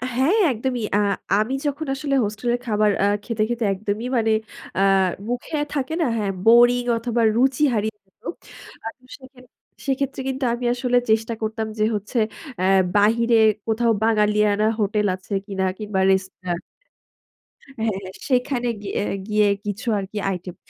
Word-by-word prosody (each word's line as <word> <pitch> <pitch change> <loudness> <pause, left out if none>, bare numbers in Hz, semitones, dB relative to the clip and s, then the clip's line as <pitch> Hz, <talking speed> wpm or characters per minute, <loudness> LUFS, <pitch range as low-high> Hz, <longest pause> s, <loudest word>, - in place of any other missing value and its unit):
হ্যাঁ, 275 - +3 0.2
একদমই। 245 0 -2
আ - - +3 0.4
আমি 225 +5 0
যখন 290 +2 -2
আসলে 275 0 -1
হোস্টেল 215 +3 -3
এর 245 - -5
খাবার 210 -2 +2
আ - - +4 0.2
খেতে, 230 -3 -1
খেতে 240 -1 -1
একদমই। 205 +3 -3
মানে 220 -1 +2 0.5
আ - - +2 0.5
মুখে 245 +5 -3 0.2
থাকে 280 +1 -2
না? - - +3
হ্যাঁ, 200 -2 -1
বোরিং 240 +2 +6
অথবা 235 0 -1
রুচি 265 +4 +2
হারিয়ে 215 0 -1
যেত। 190 - -41 0.6
আ - - -2
তো - - -34
সেখে 260 -1 -16 0.5
সেক্ষেত্রে 270 0 -1
কিন্তু 265 +1 -3
আমি 245 +1 -4
আসলে 245 0 +1
চেষ্টা 225 +1 +2
করতাম। 220 0 -2
যে - - +3
হচ্ছে 210 +5 -4 0.4
এ - - 0 0.3
বাহিরে 230 +3 +4 0.3
কোথাও 230 +1 +2
বাঙালিয়ানা 210 -1 +3
হোটেল 210 0 +1
আছে 185 +2 -9
কিনা 195 -2 -3
কিংবা 210 -3 -2
রেস্তা 190 0 0 1.4
হ্যাঁ, 220 -3 0
হ্যাঁ, 190 -1 -8 0.2
সেখানে 250 -1 +1
গিয়ে 205 - -3 0.3
গিয়ে 210 -1 +3 0.2
কিছু 205 +4 -4
আর 195 - -2
কি 215 - -6
আইটেম। 180 -1 -6
225 Hz, 155 wpm, -22 LUFS, 210-245 Hz, 1.4 s, বোরিং